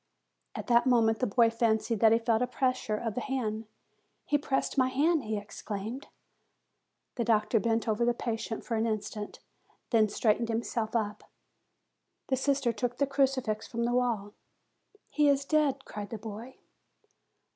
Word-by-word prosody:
At - - -5
that 240 +1 +4
moment 225 -3 +3
the 250 -5 0
lad 230 -1 +5
fancied 230 -1 +1
that 220 0 +6
he 225 - +6
felt 230 0 +1
a 250 - +1
pres 255 0 +1
sure 215 -4 -3
of 225 -1 -3
the 245 - -3
hand. 225 -5 -3 0.6
"He 295 - 0
pressed 275 -2 0
my 260 -2 +3
hand!" 290 +2 +2
he 215 0 -2
ex 205 0 -9
claimed. 220 +6 -5 1.1
The 235 - +1
doctor 220 0 +2
bent 230 +1 0
over 220 +1 +1
the 240 0 +2
patient 225 -1 -4
for 235 - -3
an 225 +1 +1
instant, 210 -1 -4 0.5
then 220 -3 +4
straightened 225 +2 +1
himself 225 0 -2
up. 210 -2 -2 1.0
The 265 - +3
sister 270 -2 +1
took 245 +3 -3
a 280 - +4
crucifix 265 -5 0
from 235 -1 -3
the 240 +1 0
wall. 230 -5 0 0.8
"He 295 -1 +3
is 280 0 +2
dead!" 285 -3 +1
cried 205 -1 -7
the 225 - -5
boy. 225 +4 -8
235 Hz, 165 wpm, -30 LUFS, 220-260 Hz, 1.1 s, that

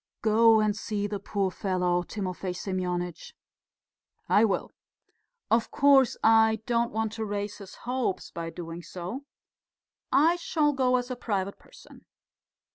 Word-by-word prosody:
"Go 225 +1 +5
and 215 -1 +1
see 205 -1 -3
the 205 -1 -3
poor 200 -1 -1
fellow, 180 -2 0
Timofey 185 -1 -4
Semyonitch." 180 -2 -4 0.9
"I 210 - +4
will. 205 -4 0 0.8
Of 230 +1 +3
course, 275 -3 +4
I 220 0 +4
don't 235 -1 +1
want 220 0 -1
to 220 0 -4
raise 205 0 -4
his 195 -2 -11
hopes 245 -6 -2
by 165 0 -5
doing 165 0 -7
so. 185 +11 -7 0.9
I 330 +5 +4
shall 305 -4 +1
go 255 -2 +2
as 250 0 -1
a - - -2
private 200 -5 -3
person.... - - -17
210 Hz, 135 wpm, -27 LUFS, 185-235 Hz, 0.9 s, Go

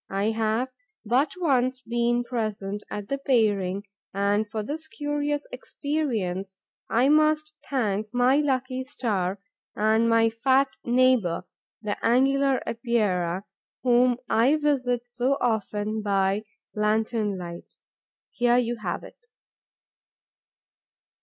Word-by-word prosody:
I 200 +3 0
have 225 +3 0 0.3
but 255 +7 +2
once 260 -6 +1
been 240 0 0
present 215 -4 -3
at 205 -1 -5
the 275 +4 -2
pairing 205 -8 +1 0.3
and 205 +2 +1
for 220 -1 -3
this 310 +7 -5
curious 290 0 -2
experience 220 - -3 0.3
I 245 +4 +3
must 305 0 +3 0.2
thank 215 -6 0
my 250 +2 +3
lucky 260 -3 0
star 205 -8 -2 0.4
and 220 +2 +3
my 225 0 +4
fat 265 +4 +3
neighbour, 245 -8 +3 0.4
the 205 -1 -3
Angular 270 +2 +3
Epeira, 200 -7 0 0.4
whom 245 -1 +4
I 250 +7 +4
visit 255 -5 0
so 250 +3 0
often 215 -2 -1
by 200 0 +1 0.3
lantern 215 -1 0
light. 170 -1 -9 0.6
Here 245 0 +3
you 240 -1 0
have 215 - -4
it. 470 - -15
235 Hz, 110 wpm, -26 LUFS, 210-260 Hz, 0.6 s, my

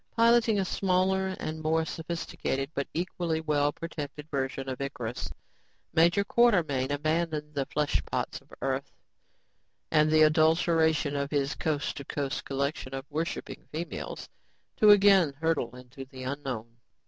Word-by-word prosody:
Piloting 230 -1 +5
a 190 - +1
smaller 190 0 +1
and 155 0 -4
more 160 +1 +1
sophisticated 160 -4 -3
but 140 - -2
equally 170 -1 -2
well 145 -2 +1
protected 150 -2 -7
version 135 -1 -2
of 130 0 -4
Icarus, 125 - -4 0.6
Major 170 +4 +4
Quartermain 175 - +3
abandoned 155 +1 -1
the 140 -2 -2
fleshpots 150 -1 -1
of - - -28
earth 135 +1 -1 1.0
and 155 -1 +4
the 155 0 +6
adulation 160 -1 +3
of 140 0 -1
his 140 -1 0
coast 150 -2 -2
to 140 - -5
coast 140 0 -3
collection 135 -1 -2
of 135 0 -5
worshiping 160 +3 -4
females 165 +3 -5 0.5
to 215 - +6
again 195 -7 +6
hurtle 160 -7 0
into 125 +2 -10
the 130 -1 -10
unknown. 130 -4 -5
155 Hz, 135 wpm, -29 LUFS, 140-165 Hz, 1.0 s, the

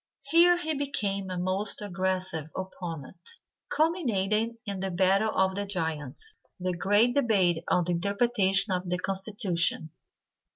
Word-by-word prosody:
Here 340 +5 +5
he 315 -2 -2
became 205 -9 -2
a 185 - -4
most 185 +3 -1
aggressive 185 -5 -3
opponent, 170 - -7 0.4
culminating 230 - 0
in 200 -2 -4
"The 190 0 -2
battle 190 +4 +2
of 190 0 +2
the 200 +1 -3
giants," 160 - -4 0.2
the 185 0 -1
great 205 +7 +3
debate 195 - +2
on 180 - +3
the 175 - -2
interpretation 200 +1 +2
of 180 0 -3
the 180 - 0
constitution. 190 -4 +1
195 Hz, 130 wpm, -28 LUFS, 180-220 Hz, 0.4 s, Here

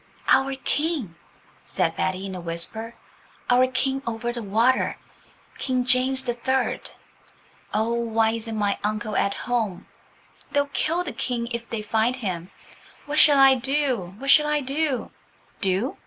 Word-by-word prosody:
"Our 270 +1 +4
King," 290 - -1 0.5
said - - -1
Betty 185 +1 -2
in 195 - -5
a 180 - -6
whisper–"our 225 +7 -2
King 265 +1 0
over 235 +1 -2
the 240 - -4
water–King 250 +3 -1
James 260 +1 +2
the 240 - 0
Third. 260 +2 -1 0.8
Oh, 220 +2 0
why 225 -1 +1
isn't 225 -1 -4
my 205 -1 0
uncle 215 +1 -2
at 200 - +1
home? 225 -6 -2 0.7
They'll 285 0 0
kill 335 +3 +1
the - - -5
King 235 -2 -2
if 235 0 -5
they 220 -2 -3
find 220 +3 +1
him. 185 -8 -4 0.6
What 295 +1 0
shall 290 -2 +7
I 270 0 +8
do? 260 -8 +1
What 275 +4 +1
shall 300 +1 +6
I 300 0 +2
do?" 275 0 -1 0.5
"Do?" 195 +7 0
240 Hz, 140 wpm, -24 LUFS, 215-265 Hz, 0.8 s, I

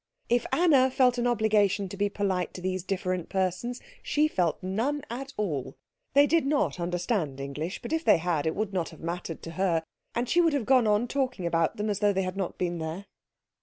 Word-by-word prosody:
If 240 0 +2
Anna 285 -7 +5
felt 250 -1 +3
an 240 - +1
obligation 215 -4 +2
to 200 - -7
be 205 +1 0
polite 190 -3 -1
to 185 - -7
these 185 0 -1
different 185 -1 -2
persons 190 +6 -1 0.2
she 300 +1 +2
felt 175 - 0
none 230 +11 -1
at 270 +3 -5
all. 145 -10 -2 0.4
They 285 +1 +7
did 325 +2 +3
not 275 - 0
understand 175 - -1
English, 145 +7 -5
but - - -4
if 320 0 0
they - - +6
had 165 -2 -1
it 160 - 0
would 210 -1 -2
not 175 -3 -1
have 160 - -14
mattered 170 -1 -5
to 165 - -6
her, 165 -2 +1 0.3
and 240 +1 0
she 350 - +4
would 330 -3 +3
have 275 -6 0
gone 255 -2 +4
on 210 +3 +2
talking 255 -8 -1
about 165 -1 +1
them 210 +1 -1
as 205 -2 -1
though 205 -1 +3
they 190 0 0
had 185 0 -3
not 190 -3 -3
been 175 -2 -2
there. 160 +5 -5
195 Hz, 215 wpm, -28 LUFS, 175-245 Hz, 0.4 s, They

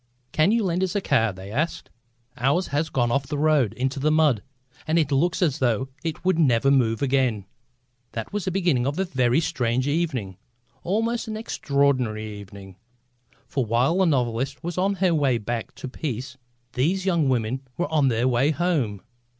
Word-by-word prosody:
"Can 155 +6 +3
you 230 0 +2
lend 180 -1 0
us 190 +1 -2
a - - +3
car?" 115 - +2
they 95 +1 -10
asked. 150 +9 -2 0.4
"Ours 140 +9 +1
has 150 +3 0
gone 120 -5 +1
off 140 +1 0
the 145 - -3
road 150 -7 +3
into 130 +2 -2
the 150 +3 +2
mud, 155 -8 +3 0.5
and 160 +2 +2
it 150 -4 +1
looks 170 +7 +2
as 155 -4 +1
though 130 +1 +1
it 165 +2 -4
would 185 -3 +2
never 135 -3 +3
move 120 -3 +2
again." 130 -7 +1 0.7
That 115 - -5
was 205 -3 -2
the - - 0
beginning 170 -9 +1
of 145 +3 -2
a 190 - +1
very 130 -5 +2
strange 125 -4 0
evening, 145 - -1 0.4
almost 225 +6 -1
an 215 -1 -4
extraordinary 140 - 0
evening. 95 -1 -12 0.7
For 135 - -1
while 120 - +1
the 190 - +4
novelist 130 0 -1
was 175 0 -4
on 195 +2 +1
her 185 -2 +2
way 140 -6 +2
back 115 +1 -4
to - - -7
peace 130 -1 -5 0.4
these 180 +9 0
young 170 -7 +2
women 125 +1 0 0.2
were 175 - -2
on 150 -3 +4
their 120 0 +1
way 130 +3 +2
home. 145 - 0
140 Hz, 185 wpm, -24 LUFS, 120-170 Hz, 0.7 s, the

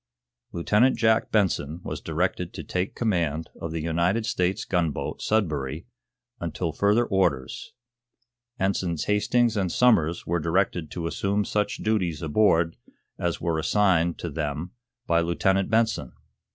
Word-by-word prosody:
Lieutenant 105 +9 +2
Jack 110 0 +2
Benson 85 -7 +1
was - - -5
directed - - -2
to - - -6
take 90 +2 -3
command 85 -8 -1
of 85 - -3
the 80 -1 -3
United 85 +7 +1
States 90 -4 0
gunboat, 85 -5 -1
'Sudbury,' 80 -8 -1 0.5
until 85 0 -3
further 105 +8 +2
orders. 90 - -1 0.9
Ensigns 95 -4 0
Hastings 115 +3 +2
and 95 -4 0
Somers 85 -10 +3
were 85 +1 0
directed 85 -1 0
to 85 - -5
assume 100 +4 0
such 105 +1 -1
duties 90 -8 0
aboard 85 0 +2 0.4
as 85 -1 -1
were 85 -2 -1
assigned 85 -1 +2
to 85 - -5
them 75 +2 -3 0.3
by 85 -4 +3
Lieutenant 95 +3 +1
Benson. 110 - +1
90 Hz, 130 wpm, -25 LUFS, 80-105 Hz, 0.9 s, Somers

